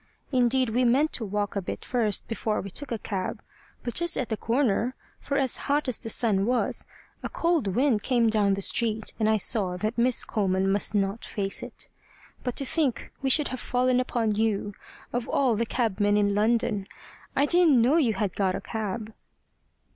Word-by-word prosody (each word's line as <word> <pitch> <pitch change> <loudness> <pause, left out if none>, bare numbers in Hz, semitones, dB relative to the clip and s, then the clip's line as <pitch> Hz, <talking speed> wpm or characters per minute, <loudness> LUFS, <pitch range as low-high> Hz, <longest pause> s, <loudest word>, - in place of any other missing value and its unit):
Indeed 255 -1 +2
we 245 +3 +2
meant 270 +6 +3
to 235 - -1
walk 205 0 -2
a 200 - 0
bit 185 - -6
first 225 -5 0
before 220 -1 -2
we 195 - -5
took 285 +6 -4
a 230 - -1
cab, 195 -3 -4 0.4
but 240 - -3
just 345 0 +2
at 250 - -2
the 220 - 0
corner, 240 +1 0 0.2
for 280 - -2
as 265 -3 +2
hot 290 0 +2
as 255 - +1
the 225 - -5
sun 210 -3 +2
was, 250 0 +1 0.3
a - - -4
cold 335 -9 0
wind 235 +2 +2
came 240 -1 +2
down 210 -3 +2
the 195 - 0
street, 220 -1 0
and 215 -1 +2
I 220 - +3
saw 190 -3 +1
that 215 +5 -2
Miss 245 +1 +3
Coleman 195 -2 0
must 205 +1 0
not 200 +2 0
face 195 -1 -2
it. - - -7 0.5
But 250 -2 -3
to 275 - 0
think 275 -3 -1
we 270 - 0
should 295 +2 +3
have 255 - -5
fallen 250 0 +1
upon 235 -4 0
you, 205 -1 -1 0.4
of 245 -1 -2
all 260 -5 +2
the 230 +2 -1
cabmen 210 -3 +1
in 205 -1 +2
London! 210 -1 +1 0.5
I 280 - +3
didn't 335 -5 +4
know 255 +8 +4
you 240 -10 +2
had 195 -1 -2
got 190 -2 0
a - - -4
cab." 220 0 -5
225 Hz, 195 wpm, -26 LUFS, 205-255 Hz, 0.5 s, didn't